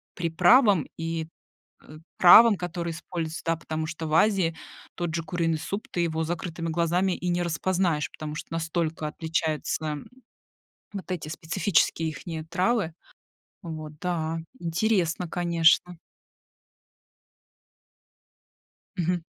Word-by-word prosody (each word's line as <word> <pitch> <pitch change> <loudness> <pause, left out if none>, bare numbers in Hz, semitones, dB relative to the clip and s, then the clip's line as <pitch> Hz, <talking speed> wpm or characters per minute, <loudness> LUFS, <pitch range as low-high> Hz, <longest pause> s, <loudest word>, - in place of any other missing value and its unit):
приправам 180 - +4
и, 165 -1 -3 0.6
э, 155 - -13 0.2
травам, 220 +5 +9
которые 170 -1 -4
используются, 165 0 -5
да. 165 0 +2
Потому 155 -1 -4
что 160 0 -5
в 155 - -4
Азии 185 -3 +3 0.4
тот 175 -2 -3
же 165 0 -2
куриный 165 -2 -1
суп, 195 +7 -5
ты - - -3
его 160 -1 0
с - - -4
закрытыми 170 -1 -4
глазами 175 +3 +1
и 180 - -3
не 175 0 +1
распознаешь, 170 -1 0
потому 150 -1 -6
что - - -6
настолько 165 -1 -2
отличаются, 160 0 -2
м, 150 -2 -4 0.9
вот 195 -2 -7
эти 175 -4 -3
специфические 165 0 +1
ихние 160 +1 -6
травы. 180 0 0 0.7
Вот, 155 -3 -7
да, 165 -3 -2 0.2
интересно, 175 0 0
конечно. 170 0 +3 3.0
Мгм. 175 -1 -1
165 Hz, 120 wpm, -26 LUFS, 160-180 Hz, 3.0 s, травам